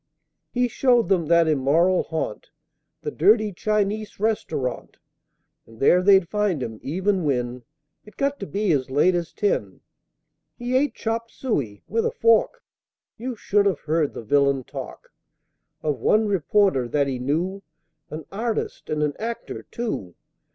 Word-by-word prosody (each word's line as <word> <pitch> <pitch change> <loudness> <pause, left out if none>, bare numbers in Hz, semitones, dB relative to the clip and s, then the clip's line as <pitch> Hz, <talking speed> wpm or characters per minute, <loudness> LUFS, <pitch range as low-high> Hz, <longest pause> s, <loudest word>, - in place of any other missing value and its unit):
He 245 0 +1
showed 245 -1 +2
them 175 -5 +2
that 170 0 +4
immoral 160 +5 +3
haunt, 160 -9 -4 0.5
The 150 - -3
dirty 210 +5 +3
Chinese 210 +2 -1
Restaurant; 160 - -2 0.7
And 115 0 -16
there 180 +6 +5
they'd 190 -2 +5
find 200 -7 0
him, 110 -2 -6
even 185 +5 0
when 125 -3 -1 0.4
It 210 - -17
got 280 0 0
to 195 - -5
be 205 -1 0
as 135 -4 0
late 145 +7 +3
as 170 -2 -2
ten! 105 - -1 0.8
He 245 +1 -2
ate 285 +3 +2
chopped 230 +1 -3
suey 135 - -3
(with 225 +3 0
a - - 0
fork) 230 - +2 0.6
You 250 +1 -4
should 205 -1 +2
have 185 -7 0
heard 155 -1 0
the - - -6
villain 140 +2 +2
talk - - -9 0.7
Of 150 -4 -1
one 215 - +3
reporter 195 - +2
that 145 +3 +1
he 135 -2 -3
knew 170 +9 -1 0.2
(!) 155 -1 -52
An 155 0 -7
artist, 225 +2 -3
and 150 0 0
an 150 -1 0
actor, 230 +1 -5
too!!! 155 - -4
180 Hz, 150 wpm, -24 LUFS, 145-215 Hz, 0.8 s, there